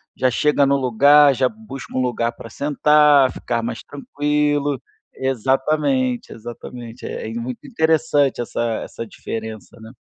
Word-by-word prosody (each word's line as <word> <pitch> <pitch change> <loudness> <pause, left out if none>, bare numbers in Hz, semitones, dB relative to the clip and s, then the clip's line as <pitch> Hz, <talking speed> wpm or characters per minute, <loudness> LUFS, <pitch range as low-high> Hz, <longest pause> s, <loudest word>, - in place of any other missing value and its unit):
já 130 -1 +1
chega 150 +2 +2
no 140 0 +3
lugar, 140 +3 +5
já 130 0 +2
busca 215 -10 -10
um 130 - +1
lugar 120 -2 0
pra 115 - -11
sentar, 145 0 +4
ficar 120 -1 -3
mais 115 - -5
tranquilo. 145 0 -1 0.3
Exatamente, 150 - 0
exatamente. 120 +1 -9
É - - -5
muito 120 +2 -6
interessante 160 - +1
essa 120 - -4 0.2
essa 115 - -7
diferença, 110 -1 -7
né. 110 0 -11
135 Hz, 130 wpm, -20 LUFS, 120-150 Hz, 0.3 s, lugar